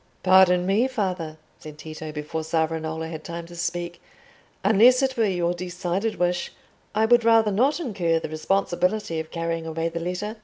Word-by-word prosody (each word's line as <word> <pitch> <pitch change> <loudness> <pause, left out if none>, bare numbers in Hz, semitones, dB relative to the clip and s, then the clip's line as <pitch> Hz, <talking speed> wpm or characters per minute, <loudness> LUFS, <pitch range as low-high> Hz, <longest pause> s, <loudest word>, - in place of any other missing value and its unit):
"Pardon 185 -1 +5
me, 205 +7 +2
father," 185 -10 -3 0.2
said 150 -1 -11
Tito, 155 0 -8
before 150 +1 -4
Savonarola 160 0 -2
had 160 -1 -7
time 170 0 -6
to 175 +1 -12
speak, 175 0 -4 0.6
"unless 235 +6 +5
it 265 -1 0
were 230 - +2
your 175 -3 0
decided 180 +4 -3
wish, 175 0 -1 0.4
I 220 +1 +3
would 240 +1 +4
rather 225 -2 +4
not 265 - +2
incur 190 - 0
the - - -4
responsibility 180 +2 -1
of 160 0 -6
carrying 165 -1 -3
away 165 +1 -2
the 170 0 -5
letter. 180 +6 -4
175 Hz, 165 wpm, -24 LUFS, 165-210 Hz, 0.6 s, Pardon